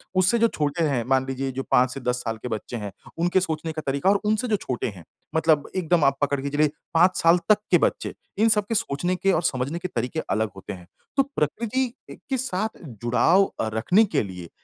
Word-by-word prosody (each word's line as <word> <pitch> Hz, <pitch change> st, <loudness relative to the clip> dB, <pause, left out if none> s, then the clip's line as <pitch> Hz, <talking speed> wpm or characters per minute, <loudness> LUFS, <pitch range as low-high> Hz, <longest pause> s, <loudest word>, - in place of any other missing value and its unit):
उससे 185 Hz, +5 st, +4 dB
जो 230 Hz, -, +5 dB
छोटे 150 Hz, -3 st, -1 dB
हैं, 140 Hz, -6 st, +1 dB
मान 130 Hz, 0 st, +2 dB
लीजिए 135 Hz, 0 st, -2 dB
जो 135 Hz, +1 st, -4 dB
5 125 Hz, +1 st, +5 dB
से -, -, -6 dB
10 125 Hz, -1 st, -1 dB
साल 115 Hz, -1 st, -3 dB
के -, -, -3 dB
बच्चे 110 Hz, +2 st, -4 dB
हैं, 105 Hz, -2 st, -5 dB, 0.3 s
उनके 175 Hz, +2 st, +2 dB
सोचने 160 Hz, -2 st, -3 dB
का 155 Hz, 0 st, -5 dB
तरीका, 140 Hz, +7 st, +1 dB
और 200 Hz, 0 st, +4 dB
उनसे 215 Hz, +4 st, +1 dB
जो 220 Hz, -, +2 dB
छोटे 130 Hz, -11 st, -3 dB
हैं, 90 Hz, -, -12 dB, 0.3 s
मतलब 160 Hz, -2 st, +2 dB
एकदम 175 Hz, -3 st, +2 dB
आप 135 Hz, 0 st, +3 dB
पकड़ 145 Hz, -1 st, +1 dB
के 140 Hz, -, -3 dB
चलिए 150 Hz, +1 st, +2 dB, 0.2 s
5 180 Hz, +3 st, +4 dB
साल 165 Hz, +1 st, +6 dB
तक 215 Hz, -, +7 dB
के 175 Hz, -, +7 dB
बच्चे, -, -, 0 dB, 0.2 s
इन 220 Hz, +2 st, +4 dB
सबके 210 Hz, +1 st, +1 dB
सोचने 180 Hz, -3 st, 0 dB
के 195 Hz, +2 st, +1 dB
और 165 Hz, -, +2 dB
समझने 140 Hz, +2 st, -1 dB
के 185 Hz, -, -3 dB
तरीके 125 Hz, -1 st, -3 dB
अलग 110 Hz, 0 st, +1 dB
होते 95 Hz, -, -7 dB
हैं। 90 Hz, -2 st, -12 dB, 0.3 s
तो 275 Hz, -, +6 dB
प्रकृति 235 Hz, -, -1 dB, 0.2 s
ए -, -, -8 dB
के 265 Hz, -, +1 dB
साथ 220 Hz, -4 st, -3 dB
जुड़ाव 125 Hz, -, +2 dB
अ, 110 Hz, -, 0 dB
रखने 180 Hz, -, +4 dB
के 205 Hz, -, 0 dB
लिए 90 Hz, -4 st, -8 dB
155 Hz, 225 wpm, -24 LUFS, 130-190 Hz, 0.3 s, तक